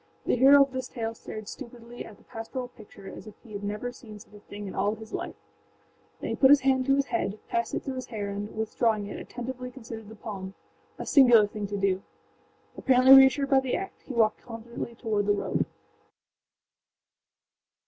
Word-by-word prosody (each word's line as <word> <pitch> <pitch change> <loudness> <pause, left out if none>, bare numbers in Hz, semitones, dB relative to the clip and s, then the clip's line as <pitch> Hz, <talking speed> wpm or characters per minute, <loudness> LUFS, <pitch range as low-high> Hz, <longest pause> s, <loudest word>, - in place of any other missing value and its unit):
The - - +2
hero 275 +3 +8
of 275 - -5
this 260 -1 -4
tale 225 -2 -4
stared 215 -2 -9
stupidly 240 -2 -9
at 210 - -12
the - - -23
pastoral 245 +3 -6
picture 205 -4 -14
as - - -9
if 215 - -11
he 225 -4 -13
had 205 0 -6
never 210 +4 -3
seen 220 -4 -12
such 210 - -16
a 205 - -12
thing 205 0 -9
in 190 - -7
all 205 +3 0
his 220 +1 -12
life; - - -4 0.8
then - - -4
he - - -1
put 265 - +5
his 285 -1 +7
hand 260 -1 +2
to 275 - +5
his 280 0 +1
head, 215 - -2
passed 235 0 -1
it - - -3
through 270 - -4
his 255 - -5
hair 205 -3 -4
and, 205 +2 -6
withdrawing 220 -1 0
it, 200 - -7
attentively 250 +1 -6
considered 225 -4 -9
the 220 - -10
palmâa 195 -3 -7 0.5
singular 245 -6 +6
thing 205 0 -5
to 205 0 -4
do. 195 -1 +1 0.7
Apparently 260 0 +6
reassured 270 +1 +7
by 270 - +6
the 265 -1 -1
act, 385 0 -6
he - - -10
walked 220 -2 +2
confidently 235 0 -7
toward 215 -4 -1
the 205 - +4
road. 205 - -1
230 Hz, 200 wpm, -27 LUFS, 210-260 Hz, 0.8 s, hero